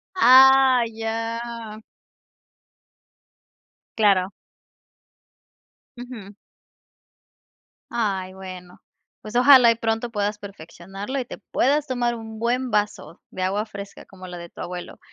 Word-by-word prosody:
Ah, 265 -4 +6
ya. 225 0 -5 2.2
Claro. 195 -4 +3 1.7
Ujú. 240 -5 -10 1.6
Ay, 195 -5 -2
bueno, 185 -2 -11 0.4
pues, 215 +2 -10
ojalá 250 -2 +7
y - - 0
pronto 225 +1 -2
puedas 205 -1 -2
perfeccionarlo 195 +5 -8
y 255 - -4
te - - -9
puedas 290 +3 0
tomar 245 -2 -1
un 220 -1 -9
buen 245 +3 -1
vaso 210 -5 -2
de 185 - -4
agua 200 +3 -1
fresca 200 -2 -10
como 185 -1 -13
la 180 0 -8
de 170 0 -10
tu - - -17
abuelo. 180 0 -7
220 Hz, 105 wpm, -23 LUFS, 195-240 Hz, 2.2 s, ojalá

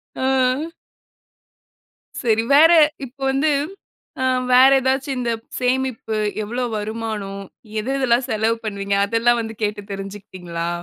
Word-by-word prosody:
ஆ. 260 +3 +1 1.6
சரி. 225 -1 +2
வேற 325 +3 +7 0.3
இப்ப 260 +3 -15
வந்து 275 +3 +1 0.7
அ - - +1 0.3
வேற 255 +2 +8
ஏதாச்சும் 265 +1 -1
இந்த 235 -1 -1 0.3
சேமிப்பு, 250 -3 -1 0.3
எவ்வளவு 240 +3 -3
வருமானம்? 210 -2 -4 0.4
எது 250 +5 -3
எதெல்லாம் 250 -1 +1
செலவு 220 +1 +1
பண்ணுவீங்க? 200 -1 -2
அதெல்லாம் 235 +2 +2
வந்து 225 0 -6
கேட்டு 210 0 -1
தெரிஞ்சுக்கிட்டீங்ளா? 185 -4 -6
230 Hz, 110 wpm, -21 LUFS, 210-260 Hz, 1.6 s, வேற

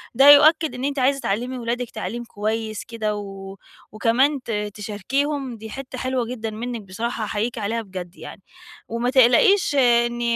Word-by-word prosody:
ده 275 +3 +7
يؤكد 310 +2 +6
إن 250 - -6
أنتِ 280 -1 -2
عايزة 275 +2 +2
تعلّمي 245 +4 -2
ولادِك 240 0 -3
تعليم 240 +1 -5
كويس 215 -1 -3
كده، 215 -2 -3
و 195 -1 -8 0.3
وكمان 255 +5 +1
ت - - -6 0.2
تشاركيهم 255 +6 -3
دي 220 0 -9
حتّة 260 +2 -8
حلوة 255 -1 -1
جدًا 225 -2 -5
منِّك 230 +1 -5
بصراحة 225 +4 -4
أحييكِ 215 +3 -2
عليها 225 +2 -2
بجد 185 -3 -8
يعني. - - -10 0.5
وما 235 +2 -1
تقلقيش 290 - +4
إن 240 -2 +3
235 Hz, 155 wpm, -22 LUFS, 215-260 Hz, 0.5 s, ده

